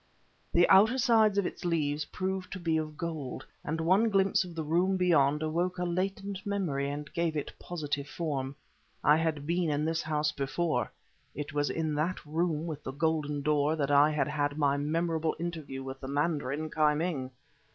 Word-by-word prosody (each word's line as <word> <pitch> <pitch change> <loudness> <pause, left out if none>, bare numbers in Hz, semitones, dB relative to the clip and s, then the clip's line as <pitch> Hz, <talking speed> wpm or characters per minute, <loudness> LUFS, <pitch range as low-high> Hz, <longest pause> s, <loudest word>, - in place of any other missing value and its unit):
The 175 +1 +5
outer 215 +7 +6
sides 220 -5 +4
of 200 - +2
its - - -5
leaves 150 -4 0
proved 190 0 -3
to 190 - -5
be 165 -2 0
of 155 -1 -4
gold, 155 -6 -4 0.2
and 160 +2 -2
one 190 +8 +3
glimpse 195 -2 +3
of 175 -2 -10
the 160 - -2
room 175 +5 +2
beyond 150 -5 +3
awoke 175 +4 -1
a 180 - -1
latent 195 +2 -2
memory 170 -9 -1
and 150 +1 -6
gave 170 -2 0
it 145 - -4
positive 145 -4 -4
form. 140 -4 -3 0.5
I 150 +1 +6
had 160 -3 -1
been 170 +1 +1
in 150 +1 0
this 165 +1 0
house 150 -1 0
before; 150 +4 -1 0.4
it 145 -1 -5
was 145 0 +1
in 160 -2 -1
that 155 +5 -1
room 160 +1 -1
with 155 -3 -5
the 130 - -4
golden 150 -1 0
door 150 +1 +2
that 145 -2 -1
I 145 +1 +6
had 150 -1 0
had 145 -1 -1
my 140 -2 +3
memorable 160 +2 0
interview 160 -6 -5
with 135 0 -7
the 135 - -7
mandarin 145 +1 -1
Ki 150 -1 +3
Ming! 150 -5 -2
155 Hz, 185 wpm, -30 LUFS, 145-175 Hz, 0.5 s, outer